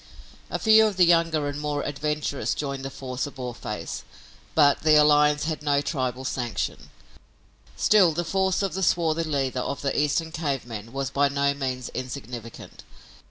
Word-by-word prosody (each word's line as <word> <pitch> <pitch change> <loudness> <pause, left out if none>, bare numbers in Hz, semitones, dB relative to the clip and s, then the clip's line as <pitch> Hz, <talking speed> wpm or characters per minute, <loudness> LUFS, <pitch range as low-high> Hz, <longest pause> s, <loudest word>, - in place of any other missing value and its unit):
A - - -2
few 220 0 +6
of 205 -3 -4
the 180 - +6
younger 165 -3 +3
and 145 0 -4
more 145 -1 -2
adventurous 150 0 -2
joined 140 -2 -4
the 135 - -4
force 130 0 -4
of 145 - -11
Boarface, 120 -4 -5 0.5
but 145 -3 +5
the 155 -1 +5
alliance 150 0 +5
had 155 0 -3
no 145 -1 +2
tribal 130 -3 -2
sanction. 120 -6 -3 0.9
Still, 195 -5 +5
the 170 +2 -2
force 190 +2 +1
of 195 - -1
the 190 - -3
swarthy 165 -2 +1
leader 135 -4 -1
of 140 +3 -4
the 140 - -1
Eastern 150 +2 0
cave 145 -6 -2
men 115 -1 -8
was 135 0 -3
by 140 0 +2
no 140 0 +1
means 130 -3 -4
insignificant. 125 -3 -8
145 Hz, 165 wpm, -25 LUFS, 130-160 Hz, 0.9 s, few